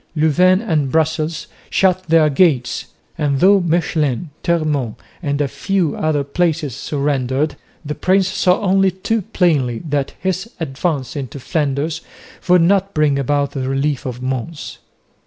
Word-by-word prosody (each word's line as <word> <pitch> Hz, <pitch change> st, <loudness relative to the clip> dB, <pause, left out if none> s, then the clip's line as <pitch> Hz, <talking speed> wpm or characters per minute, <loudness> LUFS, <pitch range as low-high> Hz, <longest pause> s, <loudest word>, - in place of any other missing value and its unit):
Louvain 180 Hz, +5 st, +4 dB
and 155 Hz, -, 0 dB
Brussels 160 Hz, +1 st, 0 dB, 0.2 s
shut 185 Hz, -1 st, +2 dB
their 160 Hz, -1 st, +5 dB
gates, 140 Hz, -5 st, +1 dB, 0.3 s
and 140 Hz, -3 st, +1 dB
though 195 Hz, +4 st, +6 dB
Mechlin, 160 Hz, -4 st, 0 dB
Termonde 155 Hz, -9 st, 0 dB, 0.3 s
and 145 Hz, -3 st, -1 dB
a 145 Hz, -, +1 dB
few 185 Hz, +2 st, -1 dB
other 155 Hz, -2 st, 0 dB
places 150 Hz, -3 st, -1 dB
surrendered, 140 Hz, 0 st, -1 dB, 0.3 s
the 150 Hz, -, -3 dB
prince 190 Hz, +3 st, +2 dB
saw 185 Hz, 0 st, +2 dB
only 195 Hz, -1 st, +3 dB
too 200 Hz, +5 st, -2 dB
plainly 150 Hz, -11 st, +1 dB
that 140 Hz, -2 st, -2 dB
his 190 Hz, +3 st, -2 dB
advance 140 Hz, -3 st, -2 dB
into 140 Hz, -1 st, -5 dB
Flanders 150 Hz, +2 st, -1 dB, 0.5 s
would 180 Hz, -1 st, +6 dB
not 195 Hz, +2 st, +2 dB
bring 150 Hz, -2 st, +2 dB
about 140 Hz, +1 st, 0 dB
the 130 Hz, -2 st, -3 dB
relief 135 Hz, 0 st, -1 dB
of 125 Hz, 0 st, -6 dB
Mons. 130 Hz, +4 st, -4 dB
155 Hz, 140 wpm, -18 LUFS, 140-180 Hz, 0.5 s, though